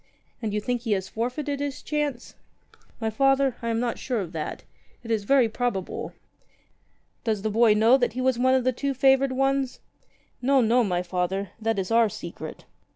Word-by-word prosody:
"And 220 -3 -2
you 210 - 0
think 245 +2 -2
he 225 -3 0
has 190 -1 -2
forfeited 270 +5 -3
his 285 0 -4
chance?" 295 -5 -3 0.7
"My 220 -1 -1
Father, 270 +1 +2
I 230 - -2
am 225 0 0
not 240 -1 -2
sure 250 -3 -2
of 180 -5 -4
that. 160 -3 -5 0.4
It 230 - -6
is 215 -3 0
very 265 0 +4
probable." 220 -4 -3 1.1
"Does 215 -3 -1
the 215 - 0
boy 225 0 +5
know 225 +5 +5
that 245 -4 0
he 250 - -5
was 255 -2 +1
one 260 +1 +4
of 260 - +2
the 255 +1 +1
two 275 +2 -2
favoured 270 +1 +4
ones 270 0 0 0.3
?" - - -36 0.2
"No, 270 +2 +4
no, 240 +1 +4
my 180 -4 0
Father. 180 +2 -2
That 225 -1 0
is 190 0 -2
our 230 -1 +4
secret. 170 -4 -8
235 Hz, 195 wpm, -25 LUFS, 210-265 Hz, 1.1 s, boy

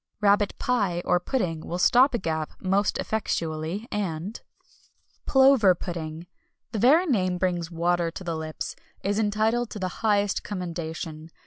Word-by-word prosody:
RABBIT 205 -1 +3
PIE, 200 -9 0
or 180 - +3
Pudding, 180 - -1
will 170 +2 -5
stop 250 +8 +5
a - - +2
gap 160 -5 -3
most 195 +2 +1
effectually, 170 -1 -2
and 195 0 -3 0.9
Plover 265 -8 +6
Pudding 165 -2 -6 0.5
the 220 - -2
very 295 - +5
name 185 - +1
brings 175 -2 -1
water 170 0 0
to 175 - -8
the 170 -2 -3
lips 155 0 -5 0.3
is 205 +2 0
entitled 220 +3 +1
to - - -7
the 185 -3 -5
highest 205 -2 +1
commendation. 165 -4 -5
185 Hz, 140 wpm, -26 LUFS, 170-215 Hz, 0.9 s, Plover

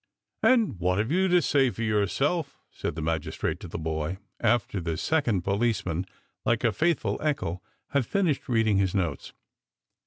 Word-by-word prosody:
" - - -61
And 225 - +3
what 90 +1 +1
have 110 +6 0
you 190 +3 +3
to 180 -2 +4
say 135 -2 +3
for 115 - -5
yourself? 135 - 0
" - - -50
said - - -4
the 80 - -4
magistrate 80 -1 -2
to - - -8
the - - -5
boy, 80 +2 -2 0.2
after 110 -5 +1
the 80 -1 -2
second 120 - +1
policeman, 100 -4 0 0.4
like 120 0 +1
a 115 - +4
faithful 165 +6 0
echo, 140 - -1 0.3
had 140 -4 +1
finished 175 -11 0
reading 110 -4 +3
his 95 -1 +1
notes. 85 -7 -2
110 Hz, 175 wpm, -27 LUFS, 90-145 Hz, 0.4 s, to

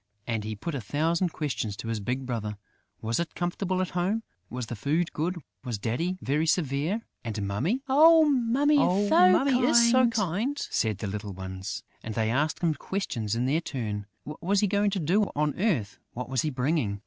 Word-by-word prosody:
And 115 -3 -2
he 110 0 -4
put 165 +11 -5
a 135 - -3
thousand 165 - 0
questions 130 -10 -3
to - - -7
his 115 -1 -1
big 125 +6 -3
brother: 110 -4 -3 0.5
was 115 +5 0
it 170 - -3
comfortable 185 +1 -1
at 185 - -4
home? 190 +6 0 0.3
Was 125 0 -4
the 120 - -6
food 155 +10 0
good? 170 +4 -1 0.3
Was 120 -4 -3
Daddy 165 - -2
very 150 +4 +1
severe? 155 - 0 0.2
And 110 -3 -3
Mummy? 165 - -1
"Oh, 315 +4 +7
Mummy 280 +2 +3
is 235 +6 +4
so 255 0 +5
kind!" 225 - -1
said 110 - -1
the 105 - -5
little 105 0 -5
ones. 95 0 -6 0.2
And 110 -1 -6
they 110 -1 +1
asked 150 +5 0
him 165 -2 +3
questions 120 - -3
in 120 +2 0
their 150 +5 +1
turn: 105 -9 -4 0.2
what 150 +1 -9
was 195 +4 +2
he - - +4
going 205 +1 +2
to 195 -1 -2
do 185 +7 +2
on 150 0 +1
earth? 155 - 0
What 125 +1 -5
was 130 -2 +1
he 155 - -1
bringing? 130 -6 -1
155 Hz, 190 wpm, -27 LUFS, -, 0.5 s, Oh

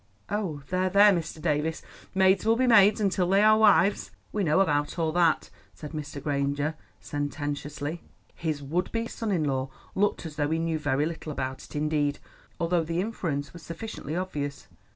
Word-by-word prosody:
"Oh, 185 -9 -2
there, 185 0 +1
there, 200 +2 +7
Mr. 165 -2 -3
Davies, 155 0 -1 0.3
maids 190 0 +4
will 225 +1 +4
be 255 +2 +2
maids 215 -3 +6
until 190 -3 +1
they 195 +2 +4
are 215 0 +7
wives. 200 -2 +4 0.2
We 210 - -1
know 155 +1 +3
about 145 -5 +1
all 160 -2 +1
that," 170 -1 +2 0.2
said 150 - -8
Mr. 150 -2 -6
Granger 140 +1 -1 0.3
sententiously. 145 +1 -4 0.3
His 155 -4 -3
would 170 +6 -1
be 230 0 -1
son 225 -1 -4
in 170 -5 +1
law 135 -2 -1 0.2
looked 205 -2 0
as 150 -2 -8
though 145 -1 +1
he 160 - +1
knew 165 -1 -1
very 145 -1 +1
little 160 -1 -5
about 130 -2 -4
it - - -14
indeed, 150 -1 0 0.4
although 170 0 +1
the 165 +2 -2
inference 170 -9 -3
was 170 - -10
sufficiently 165 -3 -6
obvious. 145 -6 -4
160 Hz, 175 wpm, -27 LUFS, 145-190 Hz, 0.4 s, there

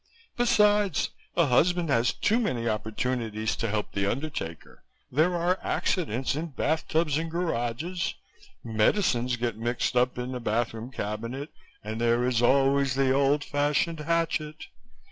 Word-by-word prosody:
Besides, 210 - +3 0.3
a 170 - +5
husband 170 +6 +2
has 120 -2 +3
too 225 +3 +1
many 125 - -1
opportunities 110 0 -2
to 115 - -2
help 105 0 -2
the 100 0 0
undertaker. 125 - -5 0.3
There 160 +7 +2
are 175 +2 +1
accidents 135 - -1
in 160 +3 -3
bath 155 +2 -1
tubs 155 -2 +1
and 165 0 -3
garages, 165 +1 -2 0.5
medicines 120 - +1
get 120 -2 -2
mixed 120 +2 -1
up 125 0 +2
in 125 +1 -3
the 125 - -4
bathroom 115 +1 -2
cabinet 115 +5 -5 0.3
and 110 +2 -4
there 120 +1 +2
is 125 -2 +1
always 135 +1 +3
the 135 -1 +2
old 140 +2 +2
fashioned 145 +3 0
hatchet. 155 -1 -1
135 Hz, 140 wpm, -27 LUFS, 115-165 Hz, 0.5 s, a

